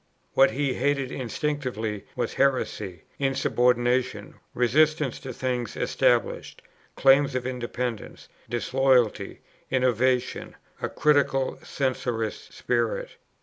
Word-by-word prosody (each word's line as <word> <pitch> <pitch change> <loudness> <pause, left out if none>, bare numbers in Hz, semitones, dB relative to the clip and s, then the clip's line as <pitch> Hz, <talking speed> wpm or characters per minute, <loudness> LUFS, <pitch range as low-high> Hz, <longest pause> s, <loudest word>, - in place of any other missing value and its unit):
What 135 - +6
he 140 -1 -1
hated 140 -1 0
instinctively 125 -5 -3
was - - -2
heresy, 105 -10 0 0.2
insubordination, 125 -2 +1 0.2
resistance 150 +3 +2
to 130 - -7
things 125 -2 -3
established, - - 0 0.3
claims 135 0 +4
of 125 -1 -2
independence, 125 -2 -4 0.2
disloyalty, 125 -1 +1 0.3
innovation, 125 0 0 0.3
a - - -1
critical, 140 -3 +1
censorious 125 -5 -2
spirit. 120 -2 -1
130 Hz, 90 wpm, -26 LUFS, 120-135 Hz, 0.3 s, What